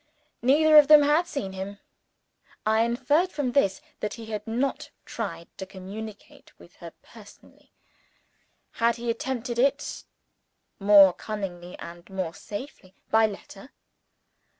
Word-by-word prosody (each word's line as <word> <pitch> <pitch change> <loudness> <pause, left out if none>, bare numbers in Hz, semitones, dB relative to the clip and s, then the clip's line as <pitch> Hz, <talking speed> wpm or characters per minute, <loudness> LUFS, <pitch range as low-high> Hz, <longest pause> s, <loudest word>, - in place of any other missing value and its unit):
Neither 305 +5 +5
of 290 - +5
them 300 -1 +8
had 305 +4 +2
seen 205 - -4
him. 190 +2 -6 0.9
I 220 +1 +3
inferred 265 +10 +1
from 275 -4 -2
this 200 -8 +1 0.2
that 210 - -4
he 230 - -9
had 210 0 -5
not 250 +5 -2 0.2
tried 170 -7 -6
to 190 - -6
communicate 200 +3 -10
with - - -18
her - - -10
personally. - - -18 1.1
Had 230 0 +3
he 235 0 -2
attempted 240 0 -4
it 280 +3 0 0.7
(more 200 -2 +7
cunningly 180 -5 -6
and 170 +2 -11
more 185 -4 -4
safely) 205 - -9 0.2
by 220 0 +5
letter? 200 +3 -11
220 Hz, 125 wpm, -26 LUFS, 195-265 Hz, 1.1 s, them